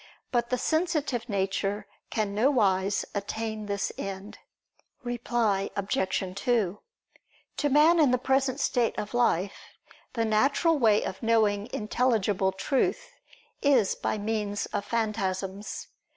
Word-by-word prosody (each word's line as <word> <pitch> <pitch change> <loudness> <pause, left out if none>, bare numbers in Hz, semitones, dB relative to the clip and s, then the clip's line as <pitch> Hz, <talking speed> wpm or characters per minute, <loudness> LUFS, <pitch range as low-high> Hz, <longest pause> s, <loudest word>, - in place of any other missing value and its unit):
But 240 -1 0
the 250 - +1
sensitive 300 -7 0
nature 195 +1 -1 0.2
can 210 -2 -1
nowise 200 -5 +2
attain 215 +1 -4
this 200 -1 -1
end. 195 +1 -6 0.6
Reply 235 -5 0
Obj. 190 -2 -1
2: 215 -6 0 0.8
To 290 - +1
man 310 +5 +5
in 295 -4 +5
the 250 - +3
present 265 +1 +1
state 245 -5 +1
of 210 - -4
life 200 -6 +2 0.6
the 230 -2 0
natural 275 +9 +2
way 215 -4 +4
of 190 - -5
knowing 220 -2 +2
intelligible 210 -4 +1
truth 275 - -1 0.5
is 260 -9 +4
by - - -2
means 210 -1 -2
of 200 - -4
phantasms. 200 -3 -3
220 Hz, 120 wpm, -27 LUFS, 200-250 Hz, 0.8 s, man